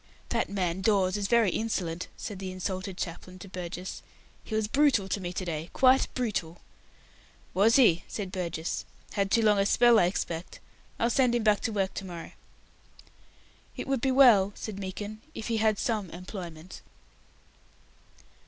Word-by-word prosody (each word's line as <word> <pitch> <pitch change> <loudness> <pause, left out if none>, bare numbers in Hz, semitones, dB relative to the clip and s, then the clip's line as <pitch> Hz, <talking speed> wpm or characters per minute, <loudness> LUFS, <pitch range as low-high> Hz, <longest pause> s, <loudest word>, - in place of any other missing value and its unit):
"That - - 0
man 185 -2 -1
Dawes 195 -2 +2
is 205 -1 -1
very 230 -4 +4
insolent," 180 -6 -2
said 205 -4 -6
the 190 -1 -5
insulted 185 0 -4
chaplain 185 +1 -6
to 190 - -10
Burgess. 180 0 -6 0.4
"He 220 - -5
was 220 -1 +1
brutal 270 -5 +3
to 195 +1 -2
me 175 -1 -4
to 185 - -3
day 165 0 -4
quite 260 0 +5
brutal." 185 -9 -2 0.9
"Was 210 +5 +4
he?" 200 -11 +5
said 195 -4 -5
Burgess. 170 -3 -3 0.3
"Had 200 -1 0
too 230 +2 +3
long 210 -2 +4
a 195 - +3
spell, 240 +1 +5
I 175 - +5
expect. 175 -2 -3 0.4
I'll 235 +1 +1
send 250 -2 +3
him 235 - 0
back 210 -2 +4
to 225 - -2
work 195 -2 -1
to 195 - -5
morrow." 170 -3 -8 1.5
"It - - -4
would 270 -3 0
be 265 - +1
well," 235 -7 +6
said 210 -3 -6
Meekin, 205 +3 -6
"if 220 - -5
he 230 - +1
had 215 -1 +2
some 215 -5 -1
employment." 175 -1 -8
195 Hz, 165 wpm, -28 LUFS, 180-220 Hz, 1.5 s, well